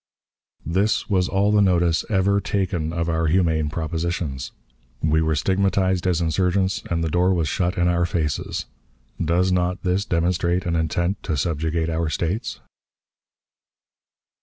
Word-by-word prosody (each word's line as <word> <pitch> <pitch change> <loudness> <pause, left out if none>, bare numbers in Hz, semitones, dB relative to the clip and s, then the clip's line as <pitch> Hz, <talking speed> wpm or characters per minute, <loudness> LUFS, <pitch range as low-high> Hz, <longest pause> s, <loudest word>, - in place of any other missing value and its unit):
This 100 +6 0
was 90 -2 +2
all 100 +2 +2
the 105 -1 +4
notice 85 -4 +2
ever 100 -1 +2
taken 90 -6 -1
of 85 0 -2
our 80 -1 0
humane 80 -3 +2
propositions. 80 -3 -3 0.5
We 80 0 +3
were 80 0 +1
stigmatized 95 +2 +1
as 90 -2 +1
insurgents, 95 +3 +1
and 85 -1 0
the - - 0
door 90 +2 +3
was 85 -3 0
shut 90 +5 -1
in 90 0 +2
our 85 0 +2
faces. 80 -5 -2 0.6
Does 90 +3 +2
not 90 +1 0
this 90 +2 +1
demonstrate 85 0 0
an 85 -1 0
intent 85 +4 -1
to 80 - -2
subjugate 80 +2 -1
our 80 0 -1
States? 85 +7 -2
85 Hz, 140 wpm, -23 LUFS, 80-95 Hz, 0.6 s, the